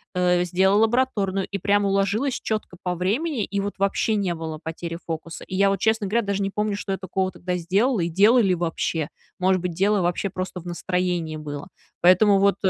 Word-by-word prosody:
э, 180 0 +2
сделала 190 +4 +3
лабораторную, 215 -5 +1
и 200 - -1
прям 205 +2 +2
уложилась 200 +7 +1
четко 215 -5 -4
по 180 -1 -1
времени, 225 - -1
и 200 0 -3
вот 200 +1 -2
вообще 200 +2 +1
не 190 -4 0
было 160 -1 -6
потери 165 +1 -5
фокуса. 165 0 -6
И 185 - -6
я 200 0 +4
вот, 195 -1 0
честно 220 -1 +1
говоря, 230 +2 +1
даже 200 0 -1
не 195 0 -1
помню, 210 -1 -1
что 200 -1 -3
я - - -2
такого 190 0 -2
тогда 180 0 -3
сделала, 200 +7 +1
и 170 - +1
делала 210 +8 +5
ли 190 -5 +3
вообще. 165 -2 -2 0.3
Может 185 0 +3
быть, 180 -2 -3
дело 200 +3 +2
вообще 175 +3 0
просто 185 -1 -5
в - - -18
настроении 175 -2 -2
было. 150 +2 -6 0.3
Поэтому 195 +3 +5
вот 200 -1 +4
190 Hz, 205 wpm, -24 LUFS, 175-205 Hz, 0.3 s, делала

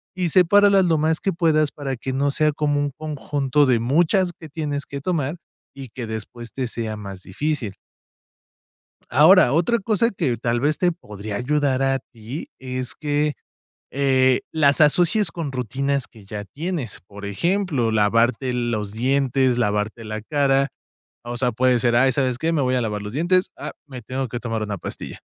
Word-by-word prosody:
y 180 -2 0
sepáralas 195 +3 +5
lo 165 -2 +2
más 160 +1 +1
que 195 - 0
puedas, 155 -3 +2
para 135 -3 -4
que 130 +3 -4
no 140 +2 +1
sea 155 +2 +2
como 145 -1 0
un 145 0 -1
conjunto 145 -1 0
de 125 -3 +3
muchas 175 - +2
que 160 - -10
tienes 145 -2 -3
que 140 0 -7
tomar, 155 -2 -1 0.4
y 135 -2 -8
que 120 +1 -6
después 110 +2 -7
te 130 - -2
sea 115 -2 -4
más 100 -3 -8
difícil. 125 -1 -3 1.3
Ahora, 155 +1 +6
otra 175 +10 +2
cosa 220 +2 +1
que 160 - -1
tal 120 +1 -1
vez 150 +3 +1
te 180 - +3
podría 105 - -7
ayudar 140 +2 +1
a 135 0 +1
ti 120 +5 -9
es 130 -1 -4
que, 150 0 0 0.6
eh, 130 -2 +3
las 145 -2 +3
asocies 175 +7 +3
con 160 -5 -4
rutinas 135 +2 -1
que 110 -4 -17
ya 105 +1 -6
tienes. 150 - -5
Por 100 +1 -10
ejemplo, 145 - 0
lavarte 115 +4 +2
los 115 -4 -2
dientes, 130 +1 +1
lavarte 105 +1 -1
la 110 0 -5
cara, 135 +2 +1 0.6
o 120 0 -5
sea, 125 0 +1
puede 125 +2 +3
ser: 120 0 +2
"Ay, 130 +2 +4
¿sabes 130 -1 0
qué? 160 +6 -1
Me 160 - +1
voy 130 0 +1
a 125 - +2
lavar 105 -2 -2
los 105 +2 -7
dientes, 180 +5 +2
ah, - - -6
me 130 -4 -9
tengo 130 +3 -3
que 120 - -4
tomar 115 -3 -3
una 105 -1 -3
pastilla". - - -8
135 Hz, 180 wpm, -22 LUFS, 120-155 Hz, 1.3 s, Ahora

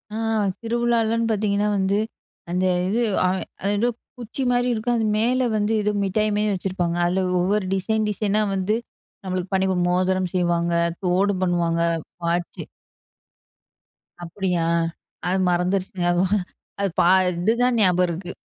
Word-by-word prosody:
ஆ - - -3 0.4
திருவிழாலன்னு 230 -1 +1
பார்த்தீங்கன்னா 210 -1 +1
வந்து, 195 +1 +1 0.5
அந்த 180 +1 0 0.2
இது 225 +5 0 0.2
அது 190 +2 -2
ஏதோ 240 +2 +2 0.3
குச்சி 240 +3 -4
மாரி 245 0 +2
இருக்கும். 235 +2 0
அது 225 - 0
மேல 250 +3 +2
வந்து, 210 +1 0
ஏதோ 210 - +1
மிட்டாய் 215 +2 0
மாரி 210 0 +1
வச்சிருப்பாங்க. 180 -2 -2
அதில 185 +2 +1 0.2
ஒவ்வொரு 195 +2 +1
டிசைன் 215 +3 0
டிசைனா 210 0 0
வந்து, 195 +3 0 0.5
நம்மளுக்கு 185 +1 -3
பண்ணி 190 0 +2 0.2
மோதிரம் 185 0 +1
செய்வாங்க, 170 -1 +1 0.3
தோடு 185 +3 +2
பண்ணுவாங்க, 170 -2 +1 0.4
வாட்ச், 170 +1 -2 1.6
அப்டியா? 175 -1 -1 0.6
அது 185 +2 +1
மறந்துருச்சுங்க. 180 +1 0 0.7
அது 200 - +1
பா - - +3 0.3
இது 200 +6 +2
தான் 250 -1 +2
ஞாபகம் 180 -1 +3
இருக்கு. 175 +2 -5
190 Hz, 125 wpm, -23 LUFS, 180-215 Hz, 1.6 s, பா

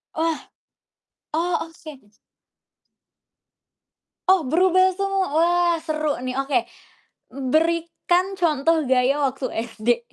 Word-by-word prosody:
Wah. 325 -1 0 0.9
Oh 335 +2 +1
oke 330 -1 -13
m 205 - -28 2.2
Oh, 375 -3 +5
berubah 370 +6 +3
semua, 390 +1 -1
wah 345 +1 +3
seru 310 -3 -2
nih. 255 0 -4
Oke, 260 -4 0 0.7
berikan 335 +6 0
contoh 325 -2 +1
gaya 260 +1 +2
waktu 270 0 -2 0.3
SD! 235 +2 0
320 Hz, 95 wpm, -22 LUFS, 270-350 Hz, 2.2 s, Oh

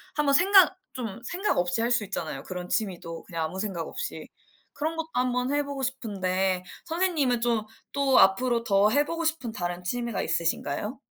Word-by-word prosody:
한번 295 -2 +2
생각 370 +3 +6 0.2
좀 225 -5 -5
생각 365 +10 -1
없이 180 +5 +1
할 235 - +1
수 240 -3 +3
있잖아요, 200 0 -4
그런 180 -1 -6
취미도 175 -6 -2
그냥 165 -3 -4
아무 185 +4 -5
생각 190 -5 -3
없이. - - -5 0.5
그런 315 +2 -2
것도 325 -1 -2
1 250 0 +1
번 250 +2 0
해 290 0 +2
보고 280 -1 -5
싶은데 190 -7 -1 0.2
선생님은 320 -8 +1
좀 230 -3 +1 0.3
또 275 -2 +4
앞으로 235 +5 +4
더 200 -1 +4
해 290 +6 +3
보고 335 +1 -3
싶은 315 -7 -1
다른 175 -3 -4
취미가 235 +3 -2
있으신가요? 170 - -1
235 Hz, 345 characters per minute, -27 LUFS, 190-280 Hz, 0.5 s, 생각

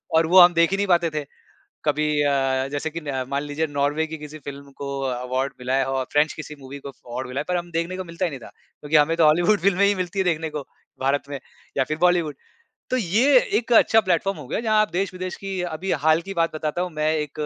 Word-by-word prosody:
और 160 - +5
वो 185 +2 +7
हम 175 0 +8
देख 170 +2 +3
ही 195 - +1
नहीं 200 0 0
पाते 170 -2 +3
थे। 150 -1 -3 0.6
कभी 150 +1 +1 0.2
अ, 135 -1 +1
जैसे 145 +2 -2
कि 170 +2 -6
न 135 -3 -2
मान 140 +1 -1
लीजिए 145 +2 -2
नॉर्वे 145 +2 0
की 160 0 -6
किसी 150 +1 -9
फ़िल्म 140 0 -9
को 140 - -5 0.4
कॉन्टेंट 130 +2 -1
मिला 125 +1 -2
है 135 0 +2
और 135 -1 -1
फ़्रेंच 150 +1 +3
किसी 150 -1 -8
मूवी 135 +1 -9
को 140 - -8
कॉन्टेंट 125 0 -7
मिला 130 +2 -4
है, - - -4
पर 180 - 0
हम 175 0 -6
देखने 170 +3 -2
को 185 - -4
मिलता 170 +2 -3
ही 175 - 0
नहीं 135 - -7
था। - - -11 0.3
क्योंकि 150 +1 -2
हमें 155 +2 +5
तो 165 - +5
हॉलीवुड 175 +7 +4
फ़िल्में 200 +1 +3
ही 200 0 +3
मिलती 185 +1 -3
है 190 - +1
देखने 160 -2 0
को 150 -1 -5 0.4
भारत 140 +2 +1
में 140 -2 -5 0.4
या 135 - +4
फ़िर 155 +4 -4
बॉलीवुड। 175 -4 +2 0.6
तो 255 - +1
ये 245 +6 +4
एक 240 +1 -1
अच्छा 225 0 +6
प्लेटफ़ॉर्म 190 -1 0
हो 140 - -9
गया, - - -1
जहाँ 215 -2 +2
आप 215 - +1
देश-विदेश 185 -1 -3
की 195 -2 -5
अभी 175 +2 -3
हाल 160 +1 +4
की 195 - -4
बात 165 -1 0
बताता 155 +3 -2
हूँ 180 - -3
मैं 155 +1 +1
एक 150 -2 -3
160 Hz, 250 wpm, -23 LUFS, 145-180 Hz, 0.6 s, हम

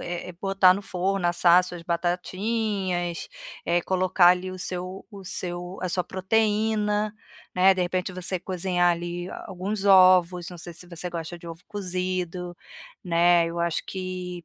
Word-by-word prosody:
eh 175 +1 -5
eh, - - -7
botar 195 -2 +5
no 200 - -5
forno, 190 0 -1
assar 175 0 +5
as 180 - -5
suas 175 -2 -8
batatinhas, 180 +1 -2 0.4
eh, 175 +1 +2
colocar 185 0 +3
ali 180 +1 +2
o 185 - -8
seu 185 0 -4
o 200 -3 -11
seu 175 +1 -4
a 185 - -1
sua 180 0 -1
proteína, 210 +2 0 0.4
né, 185 +1 +6
de 185 - -2
repente, 180 +1 -2
você 185 +1 -1
cozinhar 180 -1 +1
ali 175 +1 -5 0.2
alguns 195 +2 -4
ovos. 185 -2 +5
Não 175 - -10
sei 170 0 -8
se 180 - -12
você 175 0 -5
gosta 170 0 -6
de 170 - -10
ovo 165 +1 -9
cozido, 180 -3 -3 0.5
né. 170 -1 +4
Eu 170 +1 -5
acho 170 -1 0
que 185 -2 -5
180 Hz, 160 wpm, -25 LUFS, 175-190 Hz, 0.5 s, né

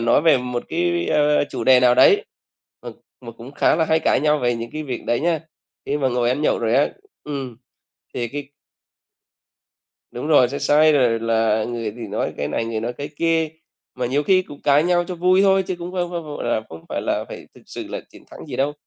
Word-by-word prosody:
nói 120 - +3
về 160 -4 +5
một 125 -1 -4
cái, 175 +1 -1
a, 150 -1 +3
chủ - - -4
đề 130 0 +6
nào 125 -1 +5
đấy 410 - +5 0.6
mà - - -7 0.3
mà 115 -2 -9
cũng 115 +4 -12
khá 145 - +2
là 160 - +2
hay 160 0 +2
cãi - - +2
nhau 150 +1 +2
về 120 -3 0
những 115 0 -6
cái 155 - -5
việc 130 -5 -5
đấy 120 - +1
nhá. 165 -1 0 0.5
Khi 145 - 0
mà 135 - +1
ngồi 120 -1 0
ăn 130 +5 -1
nhậu - - +2
rồi 115 0 0
á 140 - +3 0.4
ừm, 135 -5 -5 0.6
thì 120 -1 -2
cái 145 +2 -7 1.6
Đúng 125 +4 -5
rồi, 145 -6 +5
sẽ 140 - -4
say 150 +2 +4
rồi 120 -5 +2
là 110 -1 +1
người 115 -2 -4
thì 115 -2 -6
nói 105 - -3
cái 75 - -3
này, 115 - -2
người 115 -1 -3
nói 120 +2 -3
cái 145 +3 -7
kia. 165 -1 +1 0.5
Mà 125 -1 -2
nhiều 140 +4 0
khi 185 +3 +3
cũng 145 -4 -13
cãi 145 +1 +4
nhau 175 0 +2
cho 180 - -6
vui 185 +2 +3
thôi 195 -1 +4
chứ 185 - -3
cũng 175 +1 -7
không 175 -2 -2
không, 170 -1 -4
gọi 150 -1 -6
là, 120 -2 0
không 80 0 -11
phải - - -3
là - - -1
phải - - -9
thực - - -17
sự - - -8
là - - -5
chiến - - -17
thắng - - -11
gì 130 -4 -6
đâu, 140 +2 0
140 Hz, 235 wpm, -21 LUFS, 120-160 Hz, 1.6 s, đề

